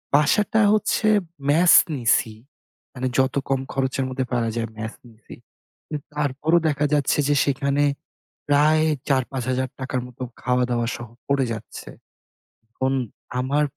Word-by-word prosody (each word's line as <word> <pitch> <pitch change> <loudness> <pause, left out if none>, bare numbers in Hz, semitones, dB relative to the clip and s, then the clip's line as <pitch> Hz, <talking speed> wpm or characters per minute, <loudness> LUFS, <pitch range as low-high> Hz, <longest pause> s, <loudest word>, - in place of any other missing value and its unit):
বাসাটা 210 +9 +3
হচ্ছে 215 +1 +1 0.4
ম্যাস 170 +4 +5 0.2
নিছি। 115 -2 +2 0.6
মানে 130 -1 -2
যত 130 0 +2
কম 135 -1 +2
খরচের 135 0 -1
মধ্যে 130 0 -2
পারা 115 -2 +1
যায়, 115 -1 -2
ম্যাস 110 +1 -5
নিছি। 110 -2 -14 0.5
কিন্তু 150 -2 -5
তারপরও 150 +4 +1
দেখা 150 0 0
যাচ্ছে 145 -1 +2
যে 145 - +3
সেখানে 140 +1 +1 0.7
প্রায় 150 +2 +4 0.3
৳৪-৫,০০০ 130 0 -2
র - - -1
মত 125 - -16 0.2
খাওয়া-দাওয়া 125 -2 +1
সহ 120 -1 -9 0.2
পড়ে 140 -1 +2
যাচ্ছে। 110 0 -8 0.8
এখন 130 +3 -2 0.5
আমার 140 +4 +1
130 Hz, 125 wpm, -23 LUFS, 125-145 Hz, 0.8 s, ম্যাস